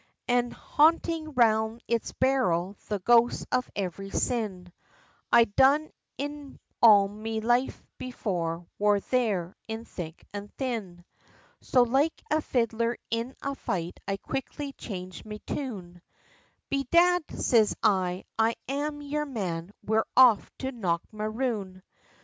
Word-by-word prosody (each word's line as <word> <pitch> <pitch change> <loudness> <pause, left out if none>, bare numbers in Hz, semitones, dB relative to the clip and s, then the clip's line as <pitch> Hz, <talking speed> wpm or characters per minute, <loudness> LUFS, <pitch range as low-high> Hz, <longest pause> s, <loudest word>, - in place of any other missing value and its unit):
An' 245 0 +2
hauntin' 320 +2 +2
round 220 -1 +2
its 230 -1 -1
barrel, 205 -9 +1
the 210 - -1
ghosts 235 +5 +3
of 255 0 0
every 195 0 -4
sin, 195 -7 -2 0.6
I 235 - +8
done 270 +8 +3 0.3
in 290 0 -6 0.2
all 205 -4 +8
me 220 +2 -4
life 240 +3 +1 0.2
before, 175 -9 -3
wor 205 0 +4
there, 200 -7 -1
in 220 +1 -5
thick 165 -5 -8
an' 205 0 -5
thin! 210 -10 -4 0.6
So 250 - +4
like 270 +7 +1
a 310 +1 +3
fiddler 230 -3 0
in 230 +3 -2
a 280 - -1
fight 175 -9 -4
I 195 - -1
quickly 275 +4 -5
changed 185 -7 -7
me 210 -1 -7
tune, 185 -11 -5 0.7
"Bedad!" 340 +6 +4 0.2
siz 220 -4 +3
I, 185 -3 +1
"It's 225 +1 +2
I'm 290 +2 -3
yer 300 +1 -2
man, 185 -8 -4
we're 220 +1 +1
off 245 -6 +6
to 265 0 -3
Knockmaroon." 215 0 -3
225 Hz, 125 wpm, -28 LUFS, 195-265 Hz, 0.7 s, I